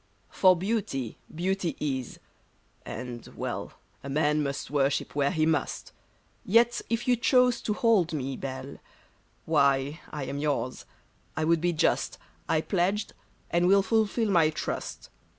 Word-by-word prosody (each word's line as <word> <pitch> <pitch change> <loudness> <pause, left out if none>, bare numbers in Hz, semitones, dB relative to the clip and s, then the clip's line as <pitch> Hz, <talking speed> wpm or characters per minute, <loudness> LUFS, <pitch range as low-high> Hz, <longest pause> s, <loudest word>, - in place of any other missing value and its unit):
For 185 -1 +5
beauty, 180 - -2
beauty 180 +1 -1
is; 130 -4 -3 0.7
and 125 -2 -6
— - - -20
well, - - -4 0.3
A 140 - -6
man 150 +1 +2
must 140 -1 -3
worship 140 -1 +1
where 140 -1 +2
he 160 -3 +1
must; 160 0 -1 0.5
Yet 235 +4 +3
if 230 +2 -1
you 250 - +5
chose 250 +1 +3
to 210 - -1
hold 210 -8 +3
me, 135 -3 -3
Belle, 130 +1 -6 0.7
Why, 140 -1 +2
I 150 - -5
am 140 +2 -4
yours; 135 -4 -2 0.5
I 160 - +1
would 165 0 +2
be 175 0 +2
just; 160 - +1 0.3
I 160 -1 +3
pledged, 195 +4 0 0.4
and 175 +1 +3
will 195 +1 +5
fulfill 220 +1 +1
my 165 -4 +5
trust. 155 - -5
160 Hz, 145 wpm, -28 LUFS, 140-200 Hz, 0.7 s, For